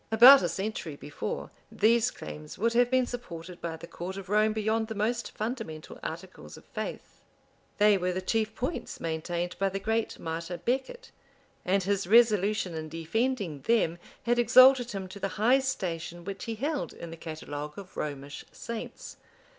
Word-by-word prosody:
[] - - -38
About 250 +5 +10
a 175 - 0
century 190 -4 -3
before, 145 +1 -5 0.2
these 230 +2 +4
claims 75 0 -9
would 230 +3 +1
have 245 +1 +4
been 255 0 +3
supported 180 -8 -7
by 165 -1 -4
the 160 - -9
court 180 +3 -6
of 195 -1 -8
Rome 215 +1 +4
beyond 220 +1 0
the 220 - -5
most 230 +3 -1
fundamental 215 -9 -5
articles - - -7
of - - -15
faith: - - -6 0.6
they 205 -1 +5
were 180 0 0
the 180 - -2
chief 220 +3 -1
points 260 +7 -4
maintained 170 +2 -3
by 195 0 +2
the 195 +1 -3
great 220 +2 -1
martyr 165 +2 -4
Becket; 270 - -3 0.5
and 190 +1 +2
his 200 -1 0
resolution 210 -4 +4
in 155 -1 -5
defending 170 - -1
them 195 -8 +2 0.2
had 240 0 +2
exalted 255 +1 +7
him 195 -3 -4
to 185 +2 -10
the 195 - -1
high 240 +6 +5
station 175 -9 -3
which 195 -1 -5
he 230 - -3
held 285 +5 -2
in 170 - -8
the - - -6
catalogue 150 -2 -6
of 195 -2 -10
Romish 145 -1 -5
saints. 230 -1 -7
200 Hz, 170 wpm, -29 LUFS, 170-230 Hz, 0.6 s, About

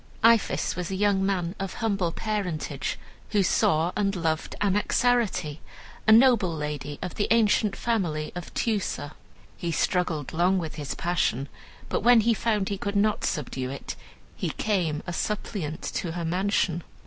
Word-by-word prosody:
"Iphis 230 -1 +3
was 180 0 -3
a 190 - -2
young 200 0 +2
man 185 -3 0
of 195 -1 -4
humble 200 -7 0
parentage, 180 -10 -3 0.3
who 205 -2 +2
saw 165 -1 +2
and 200 -1 +1
loved 160 -2 -1
Anaxarete, 205 -5 +1 0.5
a - - +7
noble 225 -5 +6
lady 150 -2 -4
of 180 - -4
the 205 - 0
ancient 215 -2 +3
family 170 -10 -1
of 175 -1 -7
Teucer. 200 -10 -1 0.5
He 170 - -2
struggled 165 -3 0
long 180 +4 +3
with 165 -4 -3
his 150 -3 -5
passion, 140 -6 0 0.4
but - - 0
when 240 +1 +6
he 230 +2 +3
found 215 -3 0
he 200 -1 -3
could 200 +1 -3
not 210 +1 +2
subdue 130 -5 -2
it, 135 +1 -6 0.4
he - - -2
came 175 -8 -1
a 175 - -4
suppliant 180 -6 -3
to 165 -3 -3
her 170 -1 -3
mansion. 180 -1 +1
185 Hz, 155 wpm, -26 LUFS, 160-210 Hz, 0.5 s, a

